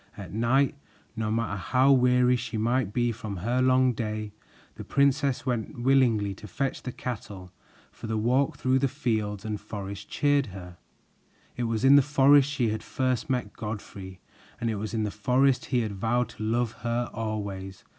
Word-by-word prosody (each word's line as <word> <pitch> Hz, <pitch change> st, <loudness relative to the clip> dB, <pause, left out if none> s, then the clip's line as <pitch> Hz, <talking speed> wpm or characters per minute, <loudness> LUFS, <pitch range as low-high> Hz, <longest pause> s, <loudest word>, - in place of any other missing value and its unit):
At -, -, -8 dB
night, 125 Hz, +5 st, +2 dB, 0.4 s
no 110 Hz, -1 st, -2 dB
matter 110 Hz, -2 st, -1 dB
how 130 Hz, +9 st, +3 dB
weary 125 Hz, -1 st, +4 dB
she 120 Hz, -2 st, -4 dB
might 115 Hz, -1 st, 0 dB
be 120 Hz, +1 st, +1 dB
from 110 Hz, -3 st, -6 dB
her 120 Hz, +8 st, 0 dB
long 130 Hz, 0 st, +4 dB
day, 110 Hz, -1 st, -4 dB, 0.4 s
the -, -, -9 dB
princess 140 Hz, -1 st, +1 dB
went 120 Hz, -2 st, -3 dB
willingly 120 Hz, -7 st, +3 dB
to 105 Hz, +2 st, -11 dB
fetch 135 Hz, +3 st, -3 dB
the 125 Hz, -, -5 dB
cattle, 100 Hz, -7 st, -7 dB, 0.4 s
for -, -, -9 dB
the 110 Hz, 0 st, -1 dB
walk 125 Hz, +5 st, +1 dB
through 130 Hz, +1 st, +2 dB
the 135 Hz, -, +2 dB
fields 110 Hz, -5 st, -2 dB
and 105 Hz, -1 st, -4 dB
forest 100 Hz, -1 st, -7 dB
cheered 145 Hz, -2 st, +2 dB
her. 90 Hz, -3 st, -10 dB, 0.8 s
It 120 Hz, -, -2 dB
was 115 Hz, +1 st, -1 dB
in 140 Hz, +1 st, +8 dB
the -, -, +7 dB
forest 140 Hz, 0 st, +5 dB
she 125 Hz, -6 st, 0 dB
had 110 Hz, +1 st, -3 dB
first 130 Hz, 0 st, -2 dB
met 125 Hz, -6 st, -1 dB
Godfrey, 100 Hz, -3 st, -7 dB, 0.4 s
and 115 Hz, -2 st, -1 dB
it 110 Hz, -, -3 dB
was 110 Hz, +2 st, -4 dB
in 110 Hz, -, 0 dB
the 105 Hz, -, -2 dB
forest 130 Hz, +4 st, +2 dB
he 125 Hz, -3 st, +1 dB
had 110 Hz, -2 st, -3 dB
vowed 115 Hz, +5 st, 0 dB
to -, -, -12 dB
love 115 Hz, +1 st, 0 dB
her 120 Hz, +1 st, -1 dB
always. 100 Hz, -4 st, -5 dB
115 Hz, 180 wpm, -27 LUFS, 105-130 Hz, 0.8 s, in